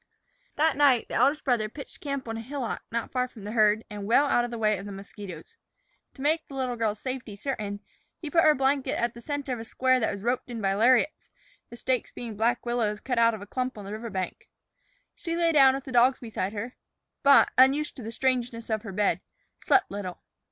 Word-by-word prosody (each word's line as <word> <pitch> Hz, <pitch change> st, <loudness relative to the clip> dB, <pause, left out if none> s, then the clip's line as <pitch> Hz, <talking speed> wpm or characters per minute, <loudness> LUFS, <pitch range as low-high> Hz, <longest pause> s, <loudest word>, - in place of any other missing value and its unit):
That 310 Hz, 0 st, +2 dB
night 275 Hz, -5 st, +4 dB
the -, -, -7 dB
eldest 295 Hz, +3 st, +3 dB
brother 235 Hz, -5 st, +1 dB
pitched 280 Hz, +5 st, -11 dB
camp 280 Hz, -3 st, -4 dB
on 225 Hz, -, -3 dB
a 225 Hz, -, -4 dB
hillock 255 Hz, 0 st, -4 dB
not 230 Hz, 0 st, -3 dB
far 250 Hz, -1 st, 0 dB
from 230 Hz, -5 st, -13 dB
the 205 Hz, -, -5 dB
herd 215 Hz, -1 st, +3 dB
and 205 Hz, -2 st, -7 dB
well 250 Hz, +6 st, +5 dB
out 245 Hz, -4 st, +2 dB
of 240 Hz, -, -4 dB
way 215 Hz, -3 st, +2 dB
of 195 Hz, -, -8 dB
the -, -, -6 dB
mosquitos. 195 Hz, -, -10 dB, 0.6 s
To 265 Hz, -, -8 dB
make 315 Hz, +2 st, +1 dB
the 275 Hz, -, -10 dB
little 255 Hz, -2 st, -1 dB
girl's 215 Hz, -2 st, -1 dB
safety 255 Hz, -5 st, -5 dB
certain, 205 Hz, -3 st, -4 dB, 0.4 s
he 310 Hz, -3 st, -7 dB
put 330 Hz, -, +5 dB
her 305 Hz, -1 st, +6 dB
blankets 270 Hz, +1 st, +1 dB
at 235 Hz, 0 st, 0 dB
the 235 Hz, -, -11 dB
center 285 Hz, -1 st, -3 dB
of 240 Hz, -, -4 dB
a -, -, -5 dB
square 255 Hz, +2 st, +2 dB
that 220 Hz, -, 0 dB
was 200 Hz, -1 st, -7 dB
roped 245 Hz, +2 st, -1 dB
in 235 Hz, -2 st, -5 dB
by 195 Hz, -2 st, +1 dB
lariats, 245 Hz, +8 st, +2 dB, 0.4 s
the 235 Hz, -, -10 dB
stakes 255 Hz, 0 st, -1 dB
being 230 Hz, -3 st, -7 dB
black 235 Hz, +4 st, 0 dB
willows 230 Hz, -3 st, 0 dB
cut 250 Hz, 0 st, -1 dB
from 230 Hz, -3 st, +3 dB
a -, -, -9 dB
clump 255 Hz, +3 st, -3 dB
on 205 Hz, -, -8 dB
the 200 Hz, -, -7 dB
river 225 Hz, +2 st, -5 dB
bank. 190 Hz, -3 st, -5 dB, 0.6 s
She 335 Hz, 0 st, -4 dB
lay 335 Hz, -1 st, +3 dB
down 270 Hz, -4 st, +6 dB
with 270 Hz, -, -5 dB
the 265 Hz, -, -8 dB
dogs 250 Hz, +2 st, +5 dB
beside 210 Hz, -4 st, -4 dB
her, 225 Hz, +4 st, -6 dB, 0.4 s
but, 280 Hz, 0 st, +6 dB
unused 275 Hz, +4 st, +4 dB
to -, -, -7 dB
the 225 Hz, 0 st, -6 dB
strangeness 240 Hz, -2 st, -1 dB
of 215 Hz, -1 st, 0 dB
her 205 Hz, -3 st, -7 dB
bed, 190 Hz, -2 st, +1 dB, 0.4 s
slept 385 Hz, -, +2 dB
little. 195 Hz, -3 st, -6 dB
240 Hz, 225 wpm, -27 LUFS, 215-265 Hz, 0.6 s, her